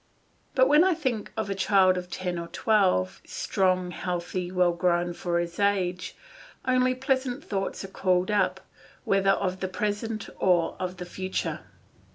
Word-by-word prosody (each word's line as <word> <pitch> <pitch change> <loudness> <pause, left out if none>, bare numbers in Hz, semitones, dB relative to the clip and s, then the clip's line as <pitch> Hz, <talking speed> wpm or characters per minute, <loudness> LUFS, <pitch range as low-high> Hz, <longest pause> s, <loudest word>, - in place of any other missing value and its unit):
But 260 -1 +5
when 300 +4 +6
I 370 -2 +3
think 240 -8 -2
of 220 -2 -1
a 200 - -1
child 190 -1 +4
of 180 -1 -5
ten 180 0 -3
or 170 - -5
twelve, 185 - +1
strong, 185 -1 0
healthy, 180 0 -3
well 180 -1 +3
grown 175 0 +1
for 170 0 -2
his 170 +1 -3
age, 185 -3 0 0.5
only 255 0 +2
pleasant 260 +1 -1
thoughts 195 -1 -3
are - - -6
called 185 0 +1
up, 190 -2 +1 0.4
whether 195 0 +2
of 185 -1 -2
the 190 - -2
present 210 +2 -3
or 175 -3 +2
the 180 -1 -4
future. 185 +1 -3
185 Hz, 155 wpm, -27 LUFS, 180-210 Hz, 0.5 s, when